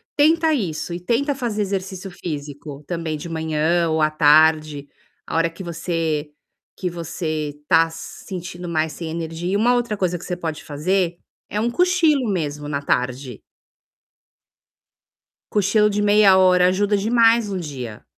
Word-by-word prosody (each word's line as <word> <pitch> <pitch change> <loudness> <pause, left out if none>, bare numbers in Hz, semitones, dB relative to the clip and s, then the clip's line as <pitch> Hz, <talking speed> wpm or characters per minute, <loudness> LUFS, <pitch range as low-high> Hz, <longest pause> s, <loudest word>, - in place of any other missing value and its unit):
Tenta 320 +2 +4
isso 175 - -2
e 175 - -4
tenta 245 - 0
fazer 235 -6 -3
exercício 190 -1 -4
físico 145 -3 -7
também 165 -3 -3
de 150 - -8
manhã 160 +1 0
ou 160 0 +1
à 155 - +4
tarde, 155 -1 +4 0.4
a - - -6
hora 165 0 +2
que 165 +3 -10
você 165 -3 -2 0.5
que 180 - -2
você 155 -3 -4
tá 165 0 +4
sentindo 175 +1 -8
mais 155 -1 -1
sem 165 -2 -6
energia. 165 +2 -4
E - - +1
uma 240 +4 +3
outra 240 -3 -1
coisa 180 -2 0
que 170 - -12
você 180 - -4
pode 160 -3 -5
fazer 170 +4 -1 0.3
é 210 - -2
um 235 +2 +1
cochilo, 320 - +2
mesmo, 150 -5 -3
na 140 -1 -2
tarde. 125 -2 -2 2.1
Cochilo 210 +1 +3
de 205 0 -1
meia 205 -2 +5
hora 180 -1 +5
ajuda 200 +3 +1
demais 225 +1 +3
o 190 - -2
dia. 130 -9 -7
175 Hz, 150 wpm, -21 LUFS, 155-205 Hz, 2.1 s, meia